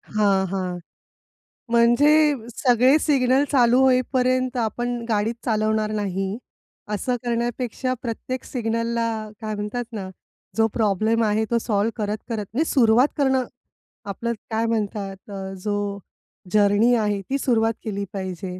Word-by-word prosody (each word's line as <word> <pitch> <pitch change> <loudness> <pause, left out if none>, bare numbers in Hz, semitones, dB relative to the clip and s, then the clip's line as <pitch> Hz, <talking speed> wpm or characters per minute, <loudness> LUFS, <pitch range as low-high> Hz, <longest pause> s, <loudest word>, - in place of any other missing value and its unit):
हां, 200 -2 +3
हां. 185 -1 -3 0.9
म्हणजे 235 +5 +5 0.4
सगळे 250 +3 +4
सिग्नल 270 -3 +3
चालू 245 -3 +4
होईपर्यंत 255 0 +2
आपण 240 +2 -1
गाडीच 220 +1 0
चालवणार 215 -1 +1
नाही. 195 -1 -2 0.6
असं 245 +5 -1
करण्यापेक्षा 240 +1 -2
प्रत्येक 250 +2 -4
सिग्नलला 230 -1 -1 0.3
काय 215 -1 -3
म्हणतात 210 +4 -3
ना, 195 -4 -5 0.5
जो 225 0 +4
प्रॉब्लेम 220 +1 +1
आहे, 215 0 +1
तो 235 - +3
सॉल्व्ह 215 -1 0
करत-करत, 210 +1 -3
म्हणजे 300 +7 +1
सुरुवात 240 0 +4
करणं. 265 -3 +2 0.6
आपलं 230 +4 -3 0.2
काय 225 +1 0
म्हणतात 205 -3 -3
अ, 195 -1 -6
जो 205 -1 -2 0.5
जर्नी 210 +3 +4
आहे, 210 -3 0
ती 265 +8 -2
सुरुवात 230 -4 +1
केली 200 -2 -3
पाहिजे. 185 -1 -5
225 Hz, 125 wpm, -23 LUFS, 205-245 Hz, 0.9 s, म्हणजे